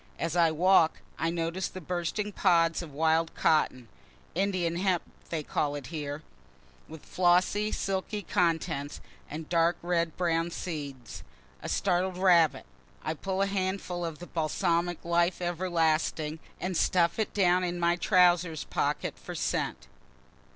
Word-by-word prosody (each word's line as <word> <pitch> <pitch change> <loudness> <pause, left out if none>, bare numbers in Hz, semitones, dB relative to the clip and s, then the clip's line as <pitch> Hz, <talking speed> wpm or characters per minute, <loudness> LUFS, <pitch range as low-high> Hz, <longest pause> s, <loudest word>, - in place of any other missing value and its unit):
As 165 0 -2
I 170 -2 +5
walk 170 +1 +4 0.3
I 165 - +1
notice 170 +2 -2
the 185 - -8
bursting 180 +5 -3
pods 170 -4 +3
of 165 -4 -8
wild 160 +3 +1
cotton, 130 -6 +1 0.5
(Indian 180 -2 0
hemp 185 -2 +1 0.3
they 160 -2 -2
call 145 0 -1
it 145 -3 -6
here,) 150 -1 -4 0.6
with 160 -1 -11
flossy 185 +4 +2
silky 195 +2 -2
contents, 165 -4 -1 0.3
and 155 +1 -6
dark 170 0 +2
red 170 -2 0
brown 170 -1 +1
seeds 145 -8 -6 0.4
a - - -5
startled 185 -1 0
rabbit 175 -4 +4 0.4
I 155 - -1
pull 190 +4 -2
a - - +2
handful 190 -2 -2
of 165 -2 -4
the 175 - -9
balsamic 170 +1 -1
life 170 +1 +2
ever 175 +1 -2
lasting 160 -2 0 0.2
and 185 0 -3
stuff 170 +3 +2
it 220 - 0
down 180 -2 +3
in 175 -1 -2
my 170 0 +3
trowsers 175 -3 +3
pocket - - -2
for - - -8
scent. 65 - -2
170 Hz, 145 wpm, -29 LUFS, 160-180 Hz, 0.6 s, I